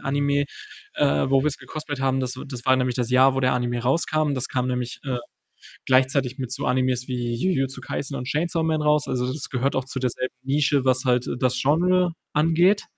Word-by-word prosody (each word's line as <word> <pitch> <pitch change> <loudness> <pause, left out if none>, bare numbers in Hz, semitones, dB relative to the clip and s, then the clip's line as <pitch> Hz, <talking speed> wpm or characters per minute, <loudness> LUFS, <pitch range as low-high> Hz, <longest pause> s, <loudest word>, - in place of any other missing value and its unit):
Anime, 140 +1 +1 0.5
äh, 70 0 +2
wo 135 -1 +4
wir‘s 150 -2 -1
gecosplayed 150 -3 -6
haben 135 0 +1
das 130 0 -3
w - - -7
das 125 -3 -7
war 130 - +5
nämlich 125 -1 0
das 125 -1 -1
Jahr, 130 +1 +5
wo 135 - 0
der 130 -1 +2
Anime 120 -1 -1
rauskam. 155 +3 +1
Das 130 0 -2
kam 125 -1 -1
nämlich, 125 -1 -3
äh, 130 -3 -2 0.7
gleichzeitig 130 0 +2
mit 130 -3 -4
so 135 - -3
Animes 125 -1 +1
wie 120 -2 -2
Jujutsu 135 -1 -1
Kaisen 140 0 -4
und 125 -1 -5
Chainsaw 165 +3 0
Man 160 -1 0
raus, 150 0 +2
also, 125 0 -1
das 145 0 -6
gehört 135 +2 -1
auch 130 - 0
zu 130 0 -4
derselben 130 0 -2
Nische, 140 0 +1
was 130 0 +2
halt, 125 -1 +2
äh, - - -2
das 125 -1 0
Genre 175 +4 +2 0.2
angeht 165 +6 +3
130 Hz, 210 wpm, -24 LUFS, 125-145 Hz, 0.7 s, war